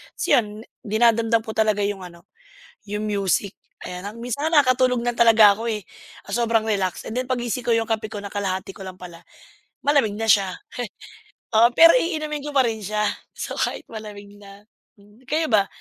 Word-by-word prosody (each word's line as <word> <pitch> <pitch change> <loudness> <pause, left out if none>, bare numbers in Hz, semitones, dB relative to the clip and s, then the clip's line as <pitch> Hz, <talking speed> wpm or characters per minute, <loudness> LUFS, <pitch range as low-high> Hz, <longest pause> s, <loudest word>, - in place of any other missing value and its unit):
Ta's - - -3
yun, 210 -2 +2 0.2
dinadamdam 225 +1 +2
ko 220 - -6
talaga 215 -2 +2
yung 200 -2 -3
ano, 170 -1 -15 0.6
yung 210 +1 -3
music. 200 -1 0 0.3
Ayan, 180 +1 -7 0.2
minsan 250 +6 -2
nga 315 -3 +6
nakatulog 255 -1 +2
na 240 0 0
talaga 225 -3 +6
ako, 230 +2 -4
eh, 210 -3 -4 0.4
sa 240 - -1
sobrang 225 -1 +1
relax 195 -4 -2
and - - -6
then 255 0 -1
paggising 245 -1 -2
ko - - +1
yung 225 0 0
kape 220 -1 -2
ko - - -5
nakalahati 195 -2 -4
ko 195 - -11
lang 185 -1 -8
pala, 175 -2 -11 0.6
malamig 280 -8 +3
na 225 0 -3
siya. 195 -3 +4 1.0
Oo 230 +2 +6
pero 330 0 +8
iinumin 310 - -3
ko - - -3
pa 270 - +5
rin 225 -1 -2
siya. 210 +2 -1 0.3
So - - -5
kahit - - -1
malamig 210 -2 -9
na. 200 0 -14 0.4
Hmm, 205 +2 -21
eh, - - -29
kayo 315 +2 0
ba? 200 -2 +4
220 Hz, 185 wpm, -22 LUFS, 200-240 Hz, 1.0 s, pero